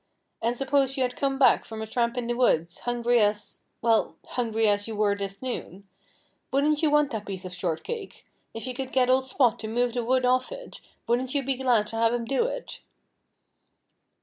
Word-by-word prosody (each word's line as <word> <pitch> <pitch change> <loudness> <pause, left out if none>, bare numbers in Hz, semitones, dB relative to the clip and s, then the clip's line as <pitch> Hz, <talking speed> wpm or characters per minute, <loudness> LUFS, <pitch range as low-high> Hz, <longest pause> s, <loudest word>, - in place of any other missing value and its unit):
And 235 +2 0
suppose 270 0 +1
you 260 - +2
had 250 -1 -2
come 275 -1 0
back 270 - +5
from 220 -1 -8
a 220 - -3
tramp 235 +2 -1
in 245 - -1
the 240 - -1
woods, 170 -9 +1
hungry 240 0 +1
as 210 0 0 0.2
well, 225 -1 +2
hungry 225 -2 0
as 205 0 +2
you 225 - -5
were 210 -1 +2
this 195 +2 -6
noon. 200 -6 -5 0.6
Wouldn't 295 +3 +2
you 315 - +3
want 295 -1 +3
that 215 -2 -5
piece 190 -1 -5
of 185 - -6
shortcake? 180 - -4 0.3
If 225 - -7
you 255 - -3
could 265 +1 -5
get 255 -1 +4
old 260 0 +2
Spot 250 -3 +2
to 220 - -4
move 240 +2 0
the 240 -1 -1
wood 255 +2 +2
off 255 - +2
it, - - -9 0.2
wouldn't 250 +3 0
you 280 - +2
be 270 +1 0
glad 245 -5 +2
to 225 - -5
have 230 +1 +3
him 235 -1 -3
do 275 - +1
it?" - - -6
240 Hz, 205 wpm, -26 LUFS, 220-265 Hz, 0.6 s, back